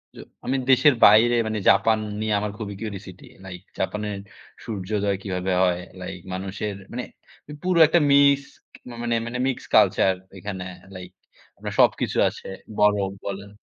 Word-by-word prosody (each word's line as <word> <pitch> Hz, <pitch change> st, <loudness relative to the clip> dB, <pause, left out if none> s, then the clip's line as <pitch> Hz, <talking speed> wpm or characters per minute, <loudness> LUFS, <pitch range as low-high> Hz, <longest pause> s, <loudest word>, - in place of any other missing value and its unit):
জ -, -, -15 dB, 0.3 s
আমি 130 Hz, +2 st, 0 dB
দেশের 135 Hz, +2 st, +6 dB
বাইরে 115 Hz, +3 st, +6 dB
মানে 110 Hz, -1 st, -2 dB
জাপান 110 Hz, +3 st, +4 dB, 0.2 s
নিয়ে 110 Hz, -1 st, -1 dB
আমার 105 Hz, 0 st, -3 dB
খুবই 105 Hz, -3 st, -6 dB
কিউরিওসিটি 95 Hz, -4 st, -8 dB, 0.2 s
লাইক 90 Hz, -2 st, -9 dB, 0.2 s
জাপানের 105 Hz, -1 st, -3 dB, 0.5 s
সূর্যোদয় 100 Hz, -1 st, -2 dB
কিভাবে 95 Hz, -1 st, -3 dB
হয়, 90 Hz, -1 st, +1 dB, 0.2 s
লাইক 90 Hz, 0 st, -7 dB
মানুষের 100 Hz, +2 st, -4 dB, 0.2 s
মানে 125 Hz, 0 st, -3 dB, 0.6 s
পুরো 180 Hz, -2 st, +2 dB
একটা 170 Hz, +2 st, +3 dB
মিক্সড 140 Hz, 0 st, +3 dB, 0.4 s
মানে 120 Hz, -1 st, 0 dB
মানে 120 Hz, +1 st, -4 dB
মিক্সড 130 Hz, -, -4 dB
কালচার 95 Hz, -, +4 dB, 0.2 s
ঐখানে 95 Hz, 0 st, -6 dB, 0.3 s
লাইক 90 Hz, -1 st, -9 dB, 0.5 s
আপনার -, -, -6 dB
সবকিছু -, -, +2 dB
আছে। -, -, -11 dB, 0.3 s
বড় 105 Hz, 0 st, +5 dB, 0.3 s
বলেন 100 Hz, 0 st, -6 dB
105 Hz, 140 wpm, -23 LUFS, 95-120 Hz, 0.6 s, দেশের